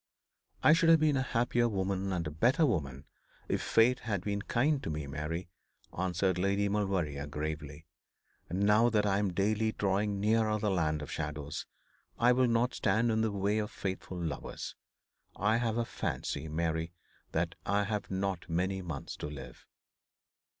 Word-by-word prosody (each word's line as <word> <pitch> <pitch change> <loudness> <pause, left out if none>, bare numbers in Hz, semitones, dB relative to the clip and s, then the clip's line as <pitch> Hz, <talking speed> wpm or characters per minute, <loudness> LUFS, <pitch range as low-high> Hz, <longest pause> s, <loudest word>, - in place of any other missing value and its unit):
'I 150 - +8
should 165 0 +4
have 165 -1 +7
been 155 -2 +3
a 135 - +2
happier 120 -1 +1
woman 95 -1 -1
and 90 -3 -1
a 75 - -3
better 125 - +3
woman 70 - -2 0.4
if - - 0
fate 125 +3 +4
had 100 -5 -2
been 100 0 -1
kind 135 +7 +1
to - - -4
me, 75 -1 -3
Mary,' 75 +6 -4 0.5
answered 90 0 0
Lady 100 +2 +2
Maulevrier, 95 -9 -1
gravely; 75 +1 -5 0.6
'and 90 +3 -2
now 105 +4 +5
that 105 -2 +2
I 100 -1 +2
am 100 -2 0
daily 105 +4 +1
drawing 100 +1 0
nearer 110 +1 +2
the 105 -1 0
land 80 -4 0
of - - -8
shadows, 75 -2 -4 0.5
I 120 +1 +5
will 125 0 +4
not 120 +2 +2
stand 115 +1 +2
in 110 0 +1
the 110 -1 +1
way 100 +2 0
of 105 -1 -2
faithful 95 -1 -5
lovers. 80 -6 -4 0.6
I 105 +3 +2
have 115 -1 0
a 120 - +1
fancy, 75 -8 -3
Mary, 80 +1 -1 0.4
that - - 0
I 100 +1 +2
have 105 0 -3
not 95 -2 -2
many 95 +3 0
months 80 -6 -5
to - - -4
live.' 65 -4 -10
100 Hz, 170 wpm, -31 LUFS, 80-110 Hz, 0.6 s, I